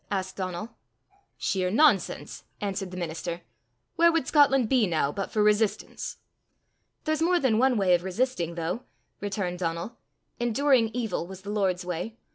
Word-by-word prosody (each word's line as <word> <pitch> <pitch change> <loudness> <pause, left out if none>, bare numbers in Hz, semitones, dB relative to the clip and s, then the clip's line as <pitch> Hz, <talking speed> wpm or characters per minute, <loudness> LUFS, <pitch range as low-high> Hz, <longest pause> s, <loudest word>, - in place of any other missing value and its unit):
asked 190 -1 -2
Donal. 185 +3 -4 0.7
"Sheer 185 -2 0
nonsense!" 225 - +2
answered 195 -2 -3
the 185 - -8
minister. 170 0 -4 0.6
"Where 340 0 +6
would 330 -5 +1
Scotland 270 -5 +4
be 240 -3 +3
now 155 -4 +1
but 195 +5 -4
for 215 - +1
resistance?" 210 0 0 0.9
"There's 310 -1 0
more 350 +2 +3
than 235 -7 +2
one 255 -1 +3
way 190 -3 +3
of 175 0 +2
resisting, 190 -3 -1
though," 170 +7 -2 0.4
returned 195 -3 -3
Donal. 170 +5 -3 0.4
"Enduring 240 0 +3
evil 225 -8 -2
was 190 0 -9
the 205 - -5
Lord's 190 -3 0
way. 180 +6 -4
200 Hz, 150 wpm, -27 LUFS, 180-245 Hz, 0.9 s, Where